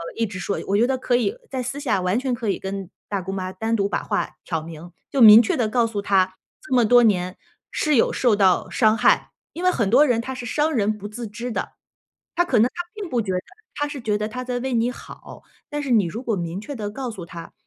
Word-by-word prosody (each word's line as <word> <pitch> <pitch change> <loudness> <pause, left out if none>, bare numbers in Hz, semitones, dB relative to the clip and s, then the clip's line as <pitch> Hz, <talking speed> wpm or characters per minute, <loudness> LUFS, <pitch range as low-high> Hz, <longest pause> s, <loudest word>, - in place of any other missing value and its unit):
一 230 - 0
直 195 -2 -7
说 200 +3 -2
我 200 - +2
觉 230 - +4
得 265 0 0
可 250 -1 +1
以 250 - 0 0.2
在 260 - -2
私 265 +3 -4
下 220 -9 0
完 180 +5 +1
全 260 -1 -1
可 230 -3 -3
以 - - -1
跟 195 -1 -5 0.2
大 200 -2 -1
姑 185 +2 -5
妈 185 -1 -4
单 225 +4 -1
独 200 -2 0
把 - - -2
话 - - -2
挑 165 -3 -2
明， 165 +1 -10 0.2
就 275 - +1
明 220 0 +11
确 230 - -1
地 235 -4 +1
告 235 0 +2
诉 210 -3 -3
她， 190 -2 +2 0.3
这 - - -6
么 245 -2 +5
多 245 +2 +6
年， 185 -4 +1 0.3
是 305 -2 +1
有 230 - +3
受 240 -4 +3
到 190 -3 +3
伤 220 -2 +3
害。 - - +3 0.2
因 345 - -6
为 365 - +5
很 225 - 0
多 260 +8 +6
人 240 -5 +1
她 265 +3 -5
是 250 - -7
伤 300 +6 0
人 215 -4 +1
不 205 0 -7
自 230 +2 -6
知 235 +4 -6
的， - - -4 0.6
她 350 - +3
可 260 - +1
能 225 - +5
她 350 - -4
并 415 -3 -5
不 245 -5 0
觉 195 -4 -3
得， 180 - 0 0.4
她 290 - -1
是 290 -2 -7
觉 210 -2 0
得 210 0 -2
她 255 +3 -5
在 250 -1 -2
为 260 +1 -3
你 235 +1 +2
好， - - -12 0.3
但 295 -1 -3
是 270 - -3
你 215 -5 +4
如 220 +9 -5
果 230 -4 0
明 170 0 -4
确 280 +7 -7
地 210 -4 -4
告 250 +3 -5
诉 190 -6 -8
她， 170 0 -10
225 Hz, 280 characters per minute, -23 LUFS, 195-250 Hz, 0.6 s, 明